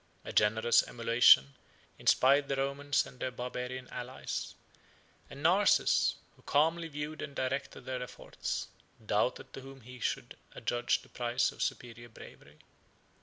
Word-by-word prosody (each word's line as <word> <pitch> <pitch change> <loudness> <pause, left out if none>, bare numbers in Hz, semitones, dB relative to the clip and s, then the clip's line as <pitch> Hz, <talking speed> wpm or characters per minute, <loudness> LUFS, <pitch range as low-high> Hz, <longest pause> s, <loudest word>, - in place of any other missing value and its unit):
A - - -6
generous 110 +3 +4
emulation 115 - +5 0.5
inspired 140 +2 +4
the 140 - -1
Romans 140 +1 0
and 125 - -14
their 130 - -2
Barbarian 125 +1 -5
allies; 125 +2 -5 0.7
and 140 +1 -10
Narses, 190 +5 +4 0.2
who - - -23
calmly 165 +3 +1
viewed 150 0 -6
and 140 -2 -7
directed 130 +1 -3
their 130 -1 -4
efforts, 125 - -5 0.4
doubted 105 +4 -1
to 135 - -8
whom 135 0 -12
he 125 +2 -12
should - - -3 0.2
adjudge 120 +1 0
the - - -19
prize 120 0 0
of - - -11
superior 120 0 -4
bravery. 110 - -14
130 Hz, 135 wpm, -31 LUFS, 120-140 Hz, 0.7 s, emulation